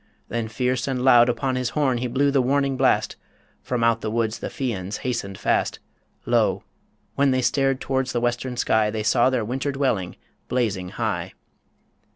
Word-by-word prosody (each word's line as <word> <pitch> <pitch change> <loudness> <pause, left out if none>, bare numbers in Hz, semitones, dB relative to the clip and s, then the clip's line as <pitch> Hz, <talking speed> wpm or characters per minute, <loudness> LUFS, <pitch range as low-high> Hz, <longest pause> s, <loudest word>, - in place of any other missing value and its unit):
Then 115 -1 -2
fierce 125 +3 -1
and 130 -2 -1
loud 120 -2 +6
Upon 130 +2 -1
his 125 -2 -1
horn 130 -5 +2
he 125 - -2
blew 140 +4 +1
the 135 -1 +3
warning 135 +1 +1
blast - - +1 0.4
From 125 -2 -2
out 115 0 +3
the 110 - -2
woods 110 0 -1
the - - -4
Fians 105 - -3
hastened 105 -6 -3
fast - - 0 0.5
Lo! - - +1 0.5
when 140 0 +2
they 130 -1 +1
stared 135 +1 +1
towards 130 -1 -1
the 120 - 0
western 120 +1 -2
sky, 110 -2 +2
They 110 0 -3
saw 120 +3 +3
their 125 -4 -1
winter 135 +5 -2
dwelling 130 -10 -1 0.3
blazing 105 -8 -1
high. - - -3
125 Hz, 175 wpm, -23 LUFS, 115-130 Hz, 0.5 s, loud